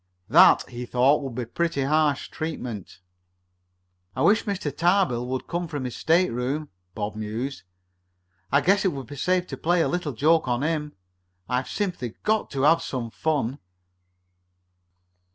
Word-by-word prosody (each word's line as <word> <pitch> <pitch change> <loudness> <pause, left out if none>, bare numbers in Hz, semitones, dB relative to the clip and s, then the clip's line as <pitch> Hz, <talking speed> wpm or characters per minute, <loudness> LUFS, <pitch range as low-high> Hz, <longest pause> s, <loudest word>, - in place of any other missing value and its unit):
That, 155 +9 +6
he 125 0 -7
thought, 130 +5 +3
would 135 -4 -6
be 125 -1 -3
pretty 165 +3 -1
harsh 150 0 +1
treatment. 120 - -6 1.1
"I 130 - 0
wish 210 +6 +4
Mr. 185 -9 -3
Tarbill 170 -9 +2
would 130 0 -3
come 175 0 -3
from 145 -4 -4
his 125 -2 -4
stateroom," 150 -3 +1 0.3
Bob 105 +1 -3
mused. 110 +6 -4 0.9
"I 140 +2 +4
guess 195 +3 +3
it 190 - +1
would 135 -2 -6
be 145 - -9
safe 180 +5 +1
to - - -7
play 175 +1 +2
a - - +1
little 175 -5 -2
joke 155 +6 +3
on 120 +2 0
him. 150 -2 -1 0.5
I've 125 +1 -1
simply 175 - -3
got 215 0 +1
to 135 -1 -2
have 165 +3 +5
some 120 -4 -4
fun." 140 -4 -1
145 Hz, 155 wpm, -25 LUFS, 125-170 Hz, 1.1 s, That